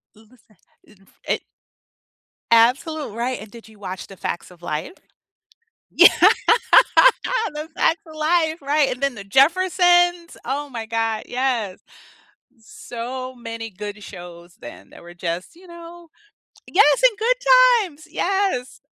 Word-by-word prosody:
Listen, 220 -1 -24 0.3
f 210 - -21 0.3
it - - -1 1.1
Absolute 255 +3 +2
right, 240 0 -3
and 215 -1 -12
did 230 -1 -14
you 215 -2 -19
watch 190 -2 -8
The 195 - -13
Facts 175 - -5
of 175 -1 -18
Life? 165 - -5 1.0
Yeah, - - +7
The 455 -7 +3
Facts 325 +1 +1
of 315 -1 -14
Life, 315 0 0
right, 285 0 +1
and 255 - -14
then 275 -3 -1
The 200 - -9
Jeffersons, 350 - +2
oh 285 +3 -3
my 230 -3 -6
god, 225 -1 -2
yes. 245 -7 -2 0.8
So 245 +3 -8
many 230 -1 -7
good 205 +2 -8
shows 175 -2 -12
then 110 -4 -12
that - - -15
were 175 0 -13
just, 175 - -5
you 360 +1 -18
know 340 0 -13 0.6
Yes, 430 +6 +3
and 470 -5 +4
Good 480 +3 +1 0.5
Times, 310 -2 -14
yes. 385 -10 -2
255 Hz, 135 wpm, -21 LUFS, 215-335 Hz, 1.1 s, Yeah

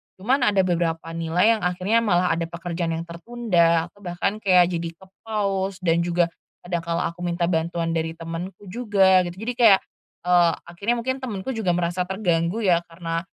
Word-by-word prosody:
Cuman 245 +9 +1
ada 200 -2 +3
beberapa 165 -2 -1
nilai 165 +7 +2
yang - - -10
akhirnya 185 +5 +1
malah 180 -5 +2
ada 165 0 0
pekerjaan 170 0 -3
yang 165 - -4
tertunda 170 -2 +1
atau 200 - -24
bahkan 175 +4 -2
kayak 180 -4 +4
jadi 170 -1 -3
kepause 195 0 -3
dan 170 -1 +3
juga 175 0 +1 0.3
kadang 175 -1 -3
kalau 170 0 -1
aku 175 +1 -4
minta 170 0 0
bantuan 165 0 -1
dari 165 0 -1
temanku 170 +4 -7
juga, 190 -4 +3
gitu. 175 - -5
Jadi 245 +2 -2
kayak, 215 -5 +7 0.4
eee, 175 -1 +4 0.2
akhirnya 200 +7 -1
mungkin 260 +3 -2
temanku 225 -4 -5
juga 190 -6 +1
merasa 175 +1 -1
terganggu 180 0 0
ya, 175 -4 +2
karena 165 0 -4
175 Hz, 170 wpm, -23 LUFS, 170-195 Hz, 0.4 s, kayak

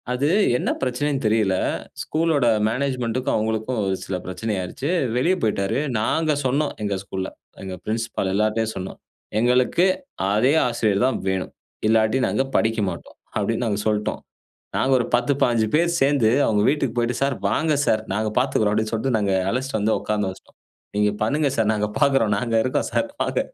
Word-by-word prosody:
அது 130 +3 0 0.3
என்ன - - -2
பிரச்சனைனு 135 +3 -1
தெரியல, 105 -3 +2 0.5
ஸ்கூல் 165 +2 0
உடைய 120 -5 +3
மேனேஜ்மென்ட்க்கும் 130 +1 -1
அவங்களுக்கும், 110 +2 -1
ஒரு 95 0 0
சில 95 - -4
பிரச்சனை 105 +4 -3
ஆயிருச்சு, 95 - -4 0.3
வெளியே 170 +10 +2
போய்ட்டார். 105 -1 0 0.2
நாங்க 155 +8 +1
சொன்னோம் 145 +4 +1
எங்கள் 100 -2 -2
ஸ்கூல்ல, 95 -1 -4 0.3
எங்க 95 -1 -5
பிரின்சிபல் 110 -3 -2
எல்லார்ட்டையும் 110 +2 0
சொன்னோம், 95 0 -6 0.4
"எங்களுக்கு 125 +8 +3 0.5
அதே 115 +7 +3
ஆசிரியர் 110 -3 +1
தான் 130 - 0
வேணும், 95 -1 -2 0.4
இல்லாட்டி 110 +3 +3
நாங்க 135 - 0
படிக்க 110 0 +2
மாட்டோம்," 85 - -9 0.2
அப்படினு 115 +2 0
நாங்க 105 -2 -1
சொல்லிட்டோம். 105 -1 -1 0.6
நாங்க 135 - +1
ஒரு 120 - -1
10, 120 +3 +3
15 115 -3 +2
பேர் 170 +1 +2
சேர்ந்து 135 -4 +3 0.2
அவங்க 105 -2 +2
வீட்டுக்கு 135 -5 -1
போய்ட்டு 120 0 0
"சார் 140 -1 +1
வாங்க 155 +9 +1
சார், 110 0 +2
நாங்க 110 +1 0
பார்த்துக்கிறோம்." 110 -6 +1
அப்படினு 110 +1 -1
சொல்லிட்டு 115 +2 0
நாங்க 100 -2 0 0.2
அழைச்சிட்டு 125 0 -2
வந்து 110 +2 +2
உட்காந்த 105 -2 -1
வச்சிட்டோம், 95 - -19 0.4
"நீங்க 105 0 +2
பண்ணுங்க 145 +5 +1
சார் 110 -1 +2
நாங்க 105 0 -1
பார்க்கிறோம், 135 -8 +3
நாங்க 115 +1 -2
இருக்கோம் 130 - 0
சார் 290 - 0
வாங்க." - - 0
115 Hz, 165 wpm, -23 LUFS, 105-130 Hz, 0.6 s, உடைய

